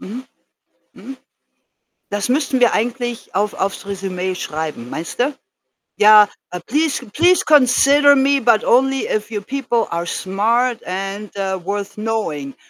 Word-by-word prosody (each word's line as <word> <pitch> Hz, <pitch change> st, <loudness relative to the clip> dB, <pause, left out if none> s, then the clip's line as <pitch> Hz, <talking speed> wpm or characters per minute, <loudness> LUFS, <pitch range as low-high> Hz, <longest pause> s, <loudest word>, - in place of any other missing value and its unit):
Mhm. 245 Hz, +7 st, -8 dB, 0.7 s
Mhm. 270 Hz, 0 st, -10 dB, 0.9 s
Das 205 Hz, +1 st, -2 dB
müssten 265 Hz, -1 st, 0 dB
wir 245 Hz, -, +4 dB
eigentlich 240 Hz, +1 st, -3 dB
auf 205 Hz, +2 st, 0 dB
auf's 195 Hz, +1 st, -3 dB
Resümee 190 Hz, -2 st, -4 dB
schreiben, 155 Hz, -8 st, -5 dB
meinst 165 Hz, +7 st, -6 dB
du? 275 Hz, +3 st, 0 dB, 0.6 s
Ja. 210 Hz, 0 st, +7 dB, 0.2 s
Ah: 180 Hz, -, -6 dB
„Please 295 Hz, -1 st, -1 dB
please 355 Hz, +6 st, +3 dB
consider 285 Hz, 0 st, +5 dB
me 275 Hz, 0 st, +2 dB
but 225 Hz, -2 st, +3 dB
only 270 Hz, +2 st, +2 dB
if 215 Hz, +1 st, -2 dB
your 210 Hz, -2 st, -3 dB
people 240 Hz, -1 st, -2 dB
are 170 Hz, 0 st, -2 dB
smart 230 Hz, +7 st, 0 dB
and, 195 Hz, +3 st, -5 dB
äh, 190 Hz, -2 st, -3 dB
worth 200 Hz, +1 st, -4 dB
knowing.“ 210 Hz, -11 st, -4 dB
220 Hz, 135 wpm, -18 LUFS, 195-260 Hz, 0.9 s, Ja